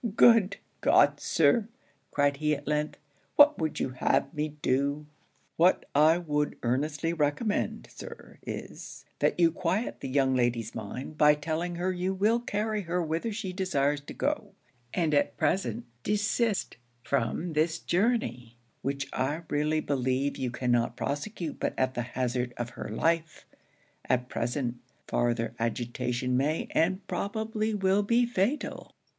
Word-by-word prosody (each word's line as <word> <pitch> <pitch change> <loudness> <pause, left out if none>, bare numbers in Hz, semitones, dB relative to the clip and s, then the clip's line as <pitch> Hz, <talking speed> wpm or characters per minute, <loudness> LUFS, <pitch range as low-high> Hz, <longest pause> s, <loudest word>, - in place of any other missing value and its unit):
'Good 220 -5 +6 0.2
God! 145 0 +5
Sir,' 165 +8 +3 0.4
cried 145 -1 +2
he 150 0 +1
at 145 0 -10
length, 150 0 -1 0.4
'what 295 +1 +7
would 155 -1 -1
you - - 0
have 130 +3 0
me 150 0 -1
do?' 140 +3 +1 0.5
'What 175 +3 +4
I 155 +3 +5
would 150 -4 -1
earnestly 145 +6 0
recommend, 155 +7 -1
Sir, - - -11
is, - - -8
that - - +1
you 165 -1 +5
quiet 185 +6 -1
the - - -5
young 135 0 +2
lady's 120 -3 0
mind 125 +8 -6
by 150 0 +7
telling 165 +3 -3
her 180 +2 0
you 185 +1 -1
will 215 +5 +3
carry 215 -2 -1
her 175 -1 -2
whither 165 +8 -2
she 200 -3 -4
desires 145 -7 0
to 145 - -10
go; - - -2 0.4
and 165 -4 0
at 145 - +2
present 120 - 0 0.2
desist 210 - 0 0.3
from 140 +7 -1
this 160 +2 +1
journey, 160 - 0 0.2
which 140 0 -2
I 145 +6 -1
really 150 +1 +1
believe 135 0 0
you 130 - -2
cannot 120 -1 0
prosecute 160 +2 -3
but - - -1
at 130 0 +1
the 120 - -2 0.2
hazard 125 -1 -1
of 120 0 -4
her - - -7
life; 160 +7 0 0.6
at 125 0 0
present, 120 0 -2 0.3
farther 115 -1 0
agitation 120 +2 -1
may, 145 +5 0
and 185 +4 +1
probably 220 +1 -2
will 195 0 +3
be 235 +4 +3
fatal.' 240 +5 -2
150 Hz, 145 wpm, -29 LUFS, 130-185 Hz, 0.6 s, what